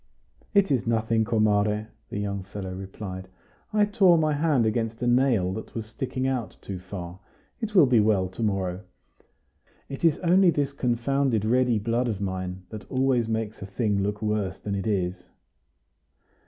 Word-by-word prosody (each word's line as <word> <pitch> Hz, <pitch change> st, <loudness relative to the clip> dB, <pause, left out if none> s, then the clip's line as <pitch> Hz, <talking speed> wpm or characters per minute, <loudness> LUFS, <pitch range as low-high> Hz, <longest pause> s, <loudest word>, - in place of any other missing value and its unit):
"It 195 Hz, -5 st, +4 dB
is 125 Hz, -4 st, +1 dB
nothing, 115 Hz, 0 st, +2 dB
comare," 105 Hz, -1 st, +1 dB, 0.2 s
the -, -, -5 dB
young 100 Hz, -1 st, -2 dB
fellow 95 Hz, 0 st, -7 dB
replied. 95 Hz, 0 st, -7 dB, 0.4 s
"I 210 Hz, -1 st, +4 dB
tore 195 Hz, -4 st, +5 dB
my 155 Hz, -1 st, +2 dB
hand 145 Hz, -5 st, +2 dB
against 115 Hz, +1 st, -1 dB
a -, -, +1 dB
nail 120 Hz, -7 st, +3 dB
that 110 Hz, -, -7 dB
was 115 Hz, -2 st, -3 dB
sticking 130 Hz, +3 st, -4 dB
out 125 Hz, -7 st, -2 dB
too 95 Hz, -2 st, -6 dB
far; 90 Hz, -1 st, -8 dB, 0.4 s
it 220 Hz, -3 st, -4 dB
will 175 Hz, -6 st, +8 dB
be 125 Hz, -3 st, +4 dB
well 105 Hz, -3 st, +3 dB
to 95 Hz, -, -8 dB
morrow. 95 Hz, -4 st, -1 dB, 1.1 s
It 135 Hz, -, -7 dB
is 165 Hz, -3 st, +4 dB
only 180 Hz, +2 st, +5 dB
this 145 Hz, -4 st, 0 dB
confounded 125 Hz, -2 st, 0 dB
ready 125 Hz, 0 st, +3 dB
blood 115 Hz, +4 st, 0 dB
of 105 Hz, -5 st, -2 dB
mine, 95 Hz, -1 st, -4 dB
that 105 Hz, -3 st, -9 dB
always 130 Hz, -3 st, +1 dB
makes 110 Hz, -1 st, -3 dB
a 95 Hz, -, -6 dB
thing 100 Hz, 0 st, 0 dB
look 105 Hz, +2 st, -2 dB
worse 105 Hz, -3 st, -1 dB
than 100 Hz, -, -4 dB
it 100 Hz, +2 st, -2 dB
is." 90 Hz, -3 st, -1 dB
110 Hz, 170 wpm, -26 LUFS, 100-130 Hz, 1.1 s, will